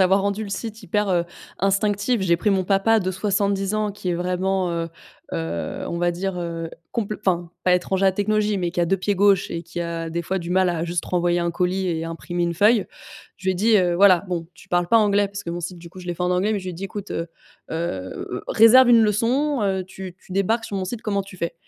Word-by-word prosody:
d'avoir 190 Hz, +1 st, +4 dB
rendu 200 Hz, +2 st, -1 dB
le 205 Hz, -, -6 dB
site 220 Hz, +2 st, -5 dB
hyper, 210 Hz, +3 st, 0 dB
heu, 175 Hz, -1 st, +2 dB, 0.3 s
instinctif. 205 Hz, +3 st, +1 dB
J'ai 170 Hz, -2 st, +3 dB
pris 210 Hz, -, 0 dB
mon 190 Hz, -2 st, +2 dB
papa 200 Hz, +4 st, +3 dB
de 185 Hz, -2 st, -1 dB
70 200 Hz, +1 st, 0 dB
ans 210 Hz, -1 st, 0 dB
qui 205 Hz, -2 st, -6 dB
est 175 Hz, -, +1 dB
vraiment, 180 Hz, +1 st, 0 dB
heu 165 Hz, 0 st, -2 dB, 0.5 s
heu, 80 Hz, +1 st, -3 dB
on 170 Hz, -, -3 dB
va 175 Hz, 0 st, +2 dB
dire, 180 Hz, +1 st, -3 dB
heu, 165 Hz, -1 st, -4 dB, 0.2 s
compl 215 Hz, -3 st, -2 dB
enfin, 175 Hz, -4 st, -1 dB
pas 180 Hz, -1 st, +5 dB
étranger 190 Hz, +2 st, 0 dB
à -, -, +7 dB
la -, -, +1 dB
technologie, 210 Hz, +1 st, +1 dB
mais 175 Hz, -1 st, -1 dB
qui 175 Hz, -, -2 dB
a -, -, +1 dB
2 195 Hz, +2 st, +1 dB
pieds 205 Hz, +2 st, 0 dB
gauche 200 Hz, 0 st, +3 dB
et 170 Hz, 0 st, -4 dB
qui 170 Hz, +1 st, -6 dB
a 165 Hz, -1 st, -3 dB
des 170 Hz, +1 st, -2 dB
fois 190 Hz, +3 st, -2 dB
du 170 Hz, 0 st, -6 dB
mal 185 Hz, 0 st, +3 dB
à 170 Hz, -1 st, -1 dB
juste 175 Hz, 0 st, -2 dB
renvoyer 175 Hz, -1 st, +1 dB
un 170 Hz, 0 st, 0 dB
colis 185 Hz, +2 st, 0 dB
et 165 Hz, -1 st, -2 dB
imprimer 175 Hz, +1 st, -4 dB
une 170 Hz, 0 st, 0 dB
feuille. 210 Hz, +3 st, +4 dB, 0.5 s
Je 190 Hz, -, -11 dB
lui 190 Hz, -, +3 dB
ai -, -, -5 dB
dit, 215 Hz, +4 st, +4 dB
heu: 175 Hz, -2 st, +2 dB
«Voilà, 195 Hz, -1 st, +6 dB
bon, 170 Hz, -2 st, -3 dB
tu -, -, -17 dB
parles 175 Hz, -1 st, +1 dB
pas 230 Hz, -, +6 dB
anglais», 205 Hz, -1 st, +3 dB
parce 200 Hz, 0 st, -7 dB
que 170 Hz, -, -8 dB
mon 175 Hz, +1 st, -4 dB
site, 175 Hz, +1 st, -6 dB
du 170 Hz, 0 st, -11 dB
coup, 185 Hz, +2 st, -12 dB
je 180 Hz, -, -11 dB
l'ai 175 Hz, -, -1 dB
fait 180 Hz, -, -4 dB
en 180 Hz, -, +1 dB
anglais, 190 Hz, +4 st, +1 dB
mais 205 Hz, -, 0 dB
je 185 Hz, -, -9 dB
lui 185 Hz, -, -3 dB
ai -, -, -7 dB
dit: 190 Hz, +4 st, -6 dB
«Ecoute, 200 Hz, +1 st, -7 dB
heu 165 Hz, 0 st, -3 dB, 0.4 s
heu, 125 Hz, -, -4 dB
réserve 245 Hz, +3 st, +7 dB
une 235 Hz, -, +7 dB
leçon, 240 Hz, +5 st, +1 dB
heu, 190 Hz, -2 st, 0 dB
tu 185 Hz, -1 st, -9 dB
tu 185 Hz, -, -12 dB
débarques 220 Hz, +4 st, +1 dB
sur 200 Hz, -, -4 dB
mon 190 Hz, -, -2 dB
site, 225 Hz, +4 st, -5 dB
comment 200 Hz, -3 st, -1 dB
tu 190 Hz, -1 st, -13 dB
fais?», 170 Hz, 0 st, -3 dB
190 Hz, 265 wpm, -23 LUFS, 175-205 Hz, 0.5 s, à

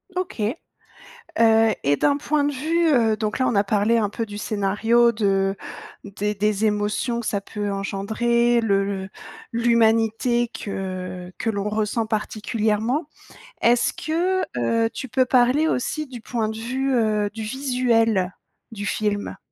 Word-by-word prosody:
OK. 365 Hz, -10 st, -3 dB, 0.9 s
Heu 225 Hz, -1 st, +4 dB
et 145 Hz, +1 st, +3 dB
d'un 285 Hz, -, +2 dB
point 295 Hz, 0 st, 0 dB
de 290 Hz, -, 0 dB
vue, 325 Hz, +5 st, +1 dB
heu, 225 Hz, -5 st, +3 dB
donc 215 Hz, -1 st, -2 dB
là, 255 Hz, -, +2 dB
on -, -, 0 dB
a 200 Hz, 0 st, +3 dB
parlé 210 Hz, +3 st, +2 dB
un 210 Hz, -2 st, 0 dB
peu 230 Hz, +1 st, -3 dB
du 205 Hz, -1 st, -8 dB
scénario 225 Hz, +3 st, +2 dB
de 195 Hz, -2 st, +1 dB, 0.5 s
des 205 Hz, +1 st, -3 dB
des 210 Hz, +1 st, 0 dB
émotions 210 Hz, +3 st, 0 dB
que 235 Hz, -, -7 dB
ça 200 Hz, -, 0 dB
peut 205 Hz, 0 st, -4 dB
engendrer, 235 Hz, +5 st, +1 dB
le 200 Hz, -3 st, +2 dB
le 195 Hz, -1 st, -4 dB, 0.4 s
l'humanité 230 Hz, +1 st, +2 dB
que 185 Hz, -3 st, -6 dB
que 230 Hz, -, -2 dB
l'on 205 Hz, -1 st, -2 dB
ressent 215 Hz, +1 st, -1 dB
particulièrement. 220 Hz, +5 st, -1 dB, 0.5 s
Est-ce 235 Hz, +1 st, +3 dB
que, 355 Hz, +4 st, 0 dB, 0.2 s
heu, 225 Hz, -, +1 dB
tu 260 Hz, -, -6 dB
peux 255 Hz, +2 st, +2 dB
parler 255 Hz, +5 st, +3 dB
aussi 305 Hz, +4 st, -1 dB
du 250 Hz, -3 st, -9 dB
point 225 Hz, -2 st, -2 dB
de 220 Hz, -, -5 dB
vue, 260 Hz, +4 st, -1 dB
heu, 215 Hz, -3 st, +1 dB
du 220 Hz, -, -5 dB
visuel 230 Hz, -5 st, +1 dB, 0.4 s
du 205 Hz, -2 st, -5 dB
film? 205 Hz, -1 st, -2 dB
225 Hz, 150 wpm, -23 LUFS, 205-240 Hz, 0.9 s, Heu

